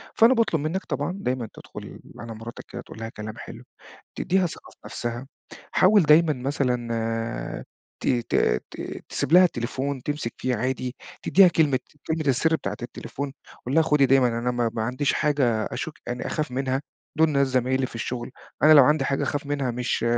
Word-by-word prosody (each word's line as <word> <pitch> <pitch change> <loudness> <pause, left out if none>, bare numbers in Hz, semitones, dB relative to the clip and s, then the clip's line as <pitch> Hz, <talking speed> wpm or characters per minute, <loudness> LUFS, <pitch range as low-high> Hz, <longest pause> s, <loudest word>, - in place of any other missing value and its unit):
فأنا 230 +3 +6
باطلب 225 - +1
منّك 165 +6 -2
طبعًا 165 +7 -2
دايمًا 125 - -2
تدخُل - - -10 0.2
على 115 -1 -7
مراتك 115 +2 -8
كده 120 - -6
تقول 110 - -12
لها 115 0 -5
كلام 110 -1 -8
حلو، - - -9 0.6
تدّيها 190 0 +2
ثقة 165 - -10
في - - -21
نفسها. 120 +2 -5 0.5
حاول 200 +2 +5
دايمًا 155 +1 +5
مثلًا 115 - -2 0.4
ت - - 0
ت 120 -3 0 0.4
ت - - -7
تسيب - - -2
لها 180 +1 +9
التليفون 135 -2 -2
تمسك 145 -5 -3
فيه 130 -1 -1
عادي، 125 +2 -2 0.3
تدّيها 190 -1 +6
كلمة 150 -6 +2 0.3
كلمة 160 0 -1
السِر 160 +5 +3
بتاعة 100 -5 -4
التليفون، 135 +3 -6 0.3
قُل 130 - -1
لها 165 - +6
خُدي 150 -3 +3
دايمًا 130 -1 +4
أنا 120 +1 0
ما 120 -2 0
ما 110 - -1
عنديش 130 +5 0
حاجة 150 -2 +1 0.2
أشُك 160 - -4
يعني 120 0 -4
أخاف 155 -4 -2
منها، 130 +1 -1 0.3
دُول 160 +1 +5
ناس 140 -1 +3
زمايلي 130 +1 +1
في - - -14
الشغل، 120 +1 -4 0.3
أنا 155 - +8
لو 145 -3 +9
عندي 150 +3 +3
حاجة 135 - 0
أخاف 145 -1 -2
منها 140 -3 -1
مش 120 -1 -1
135 Hz, 180 wpm, -25 LUFS, 120-155 Hz, 0.6 s, لها